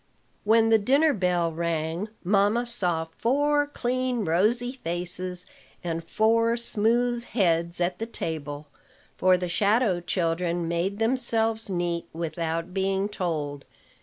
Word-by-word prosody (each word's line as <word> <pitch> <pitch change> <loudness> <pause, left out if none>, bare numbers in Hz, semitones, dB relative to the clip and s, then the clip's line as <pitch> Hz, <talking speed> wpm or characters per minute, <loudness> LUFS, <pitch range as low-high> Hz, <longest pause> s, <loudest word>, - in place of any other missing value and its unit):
When 225 +1 +4
the 225 -1 +5
dinner 280 +8 +3
bell 180 -5 0
rang, 165 +3 -2
mamma 205 +5 +2
saw 180 -9 -1
four 290 +4 +2
clean, 255 -4 -2
rosy 215 +9 +1
faces 180 -4 -3 0.4
and 165 -1 -3
four 230 +6 +2
smooth 235 +1 +1
heads 170 -7 +2
at 175 0 -1
the 225 - -3
table; 150 -8 -5 0.5
for 185 0 +4
the 180 0 -3
shadow 200 +2 +2
children 170 -1 -1
made 170 +4 -1
themselves 225 -2 +2
neat, 175 -2 -2
without 165 +1 -3
being 195 +1 0
told. 150 -8 -3
185 Hz, 120 wpm, -26 LUFS, 170-230 Hz, 0.5 s, the